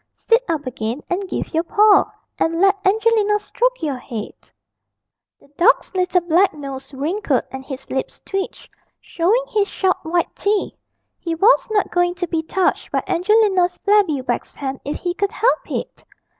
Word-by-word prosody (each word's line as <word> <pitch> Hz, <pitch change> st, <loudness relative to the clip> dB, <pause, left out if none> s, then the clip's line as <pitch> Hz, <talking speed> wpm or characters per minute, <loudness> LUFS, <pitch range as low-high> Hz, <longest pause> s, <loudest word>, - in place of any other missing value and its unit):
Sit 465 Hz, +1 st, +2 dB
up 310 Hz, -3 st, -1 dB
again 240 Hz, +1 st, -4 dB
and 375 Hz, +1 st, -2 dB
give -, -, -4 dB
your 325 Hz, -, +2 dB
paw, 410 Hz, +4 st, +4 dB, 0.3 s
and 330 Hz, +1 st, 0 dB
let 390 Hz, +2 st, +5 dB
Angelina 420 Hz, +1 st, +2 dB
stroke -, -, -1 dB
your 280 Hz, -5 st, -2 dB
head.' 230 Hz, -4 st, -8 dB, 0.9 s
The -, -, -23 dB
dog's 415 Hz, +4 st, +3 dB
little 365 Hz, -1 st, +1 dB
black 345 Hz, +3 st, +2 dB
nose 270 Hz, -2 st, -8 dB
wrinkled 295 Hz, +1 st, -1 dB
and 265 Hz, 0 st, -7 dB
his 265 Hz, -1 st, -8 dB
lips 265 Hz, -, -3 dB
twitched, 390 Hz, -1 st, -4 dB, 0.3 s
showing 400 Hz, +9 st, +1 dB
his 410 Hz, -2 st, +1 dB
sharp 380 Hz, -2 st, 0 dB
white 340 Hz, +2 st, -1 dB
teeth: 405 Hz, 0 st, 0 dB, 0.5 s
he 335 Hz, -2 st, -3 dB
was 410 Hz, +9 st, +4 dB
not 425 Hz, -2 st, 0 dB
going 355 Hz, 0 st, +1 dB
to 355 Hz, 0 st, -2 dB
be 330 Hz, -1 st, -1 dB
touched 365 Hz, +4 st, -1 dB
by -, -, 0 dB
Angelina's 375 Hz, -1 st, +2 dB
flabby 400 Hz, -9 st, +3 dB
wax 245 Hz, -2 st, -3 dB
hand 270 Hz, -1 st, -4 dB
if 290 Hz, -, -4 dB
he 350 Hz, -1 st, -3 dB
could 400 Hz, +2 st, -1 dB
help 480 Hz, +3 st, +1 dB
it! -, -, -5 dB
360 Hz, 165 wpm, -20 LUFS, 300-410 Hz, 0.9 s, let